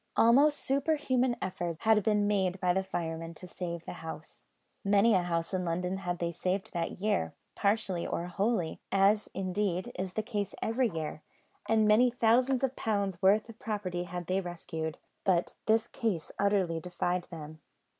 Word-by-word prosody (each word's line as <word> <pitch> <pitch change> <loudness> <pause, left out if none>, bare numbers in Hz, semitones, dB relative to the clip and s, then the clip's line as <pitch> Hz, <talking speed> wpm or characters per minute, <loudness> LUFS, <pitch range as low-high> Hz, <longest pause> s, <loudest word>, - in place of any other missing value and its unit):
Almost 280 +6 +6
superhuman 270 -3 +1
efforts 175 -3 -3
had 220 -1 +4
been 210 0 +2
made 190 -2 +1
by 180 -1 +2
the 190 +1 +1
firemen 165 -2 -4
to 180 - -10
save 170 -1 -5
the - - -5
house. 160 -1 -8 0.4
Many 205 +3 +4
a 185 - +4
house 170 0 -2
in 185 -1 0
London 180 +2 -1
had 180 -2 -3
they 170 0 -1
saved 185 +3 -2
that 170 0 -3
year, 205 0 0 0.2
partially 200 -4 0
or 170 - -2
wholly; 190 -1 -1
as, 200 +2 +3
indeed, 185 -1 -1
is 185 -1 -3
the 215 - -1
case 205 -3 -3
every 235 +2 +1
year, 160 -3 -4 0.5
and 220 -1 +4
many 225 +4 +6
thousands 245 +3 +3
of 265 0 0
pounds' 200 -5 -1
worth 200 +3 +4
of 230 -1 -12
property 185 -5 -3
had 175 0 -5
they 185 +3 0
rescued; 165 -3 -5 0.3
but 180 -3 +2
this 225 +1 +3
case 205 -11 -2
utterly 195 -5 +2
defied 180 +1 -2
them. 155 -2 -9
190 Hz, 165 wpm, -30 LUFS, 175-220 Hz, 0.5 s, Almost